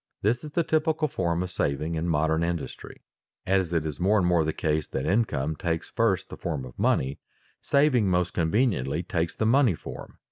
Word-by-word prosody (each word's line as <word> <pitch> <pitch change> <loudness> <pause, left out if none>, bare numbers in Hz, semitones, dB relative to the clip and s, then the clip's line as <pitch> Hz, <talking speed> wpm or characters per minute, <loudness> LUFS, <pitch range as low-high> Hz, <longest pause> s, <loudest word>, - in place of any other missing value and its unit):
_ - - -60
This 115 +4 +1
is 150 -1 -8
the 170 - +2
typical 155 0 +1
form 85 - -1
of 90 - -6
saving 75 0 -1
in 80 +2 -1
modern 80 +1 +1
industry. 85 -2 -5 0.4
As 95 -2 +1
it 80 -2 0
is 75 -3 -4
more 100 +4 +3
and 95 - +2
more 90 -2 +3
the 80 - 0
case 75 -1 -1
that 65 - -3
income 90 - 0
takes 80 0 -3
first 95 -5 +1
the - - -7
form 75 -7 -3
of 60 - -12
money, 65 +2 +1 0.4
saving 140 -7 +3
most 90 -1 +1
conveniently 85 - +1
takes 85 -2 -2
the 110 - -1
money 120 - +4
form. - - -9
90 Hz, 200 wpm, -26 LUFS, 80-110 Hz, 0.4 s, money